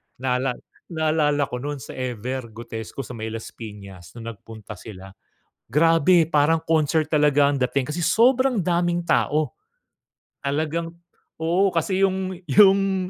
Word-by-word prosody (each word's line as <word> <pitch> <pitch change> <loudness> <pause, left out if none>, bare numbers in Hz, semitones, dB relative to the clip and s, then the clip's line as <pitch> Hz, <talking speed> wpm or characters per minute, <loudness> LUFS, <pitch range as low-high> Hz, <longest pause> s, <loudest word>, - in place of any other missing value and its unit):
naala 125 0 -1 0.3
naalala 155 -3 +1
ko 125 - -3
nun 145 +3 -4
sa - - -9
Ever 125 0 -4
Gotesco, 115 +3 -7
sa - - -10
may 110 -2 -5
Las 110 0 -7
Pinas 100 -4 -11
nung 115 -1 -6
nagpunta 110 0 -11
sila. 95 -3 -11 0.6
Grabe 165 +3 +4
parang 160 +2 +3
concert 160 -1 +1
talaga 145 -2 +4
ang 140 - -2
dating 130 +2 -1
kasi 170 - -4
sobrang 245 +4 +3
daming 175 0 0
tao. 155 -2 +1 0.9
Talagang 160 +4 -2 0.5
oo, 175 +4 +2
kasi 185 +3 0
yung 190 -1 0 0.2
yung 195 -2 +4
150 Hz, 135 wpm, -23 LUFS, 125-170 Hz, 0.9 s, Grabe